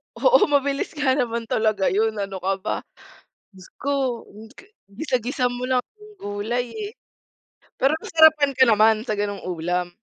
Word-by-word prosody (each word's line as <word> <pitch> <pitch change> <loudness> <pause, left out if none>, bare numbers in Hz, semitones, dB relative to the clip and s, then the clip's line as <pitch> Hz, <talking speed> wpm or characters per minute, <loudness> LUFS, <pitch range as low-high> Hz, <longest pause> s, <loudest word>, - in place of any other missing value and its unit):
Oo, - - +4
mabilis 285 +1 0
nga 290 -3 +1
naman 235 -2 -1
talaga 215 -3 +1
yun, 220 +2 +1
ano 195 -2 -4
ka 190 +2 0
ba? - - -1 0.8
Diyos 190 -1 -15
ko 265 -4 -1 0.6
gisa-gisa 250 +2 -1
mo 245 +1 -4
lang 255 -1 +1 0.2
yung 425 0 -15
gulay 220 +4 -3
eh. 425 -1 -6 0.9
Pero 275 +4 +3
nasarapan 315 -3 +4
ka 260 - +5
naman 220 0 +5
sa 210 - -1
ganong 205 -1 -3
ulam? 180 0 -2
240 Hz, 145 wpm, -23 LUFS, 205-280 Hz, 0.9 s, ka